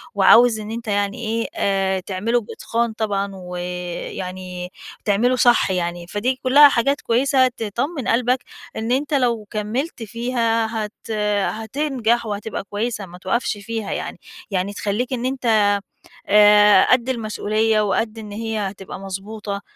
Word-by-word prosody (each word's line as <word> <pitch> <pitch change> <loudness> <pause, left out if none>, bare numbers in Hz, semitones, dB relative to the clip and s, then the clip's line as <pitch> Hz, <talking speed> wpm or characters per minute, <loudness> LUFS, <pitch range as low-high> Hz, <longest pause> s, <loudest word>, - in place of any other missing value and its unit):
وعاوز 235 -1 +6
إن 215 0 -6
أنت 230 0 -6
يعني 200 -1 0
إيه 230 +1 -1
آآ 195 -1 +1
تعمله 205 +6 -1
بإتقان 230 +1 -2
طبعًا، 200 -2 -2
ويعني 180 0 -6 0.3
تعمله 225 +5 +2
صح 240 -5 +4
يعني. 175 -1 -2
فدي 215 +8 -1
كلها 285 +3 +8
حاجات 275 +3 +1
كويسة 260 +2 +3
تطمن 245 - -3
قلبك، 250 +2 +2 0.3
إن 220 +2 -3
أنت 280 +4 0
لو 240 -5 +1
كمّلت 230 +6 -3
فيها، 230 0 0 0.2
هت 215 +2 -11 0.4
هتنجح 235 0 -1
وهتبقى 210 0 -4
كويسة، 210 +1 -3
ما 180 -1 -12
توقَفش 205 +4 -1
فيها 220 +1 -5
يعني، - - -4 0.3
يعني 195 +1 -1
تخليك 210 +6 -2
إن 245 -1 -2
أنت، 260 0 -3 0.8
آآ 210 -1 +7
قد 255 0 +3
المسؤولية، 215 -2 0
وقد 215 +2 -1
إن 210 -2 -9
هي 225 +1 -3
هتبقى 195 -2 -5
مضبوطة، 200 +1 -6
220 Hz, 135 wpm, -21 LUFS, 200-240 Hz, 0.8 s, كلها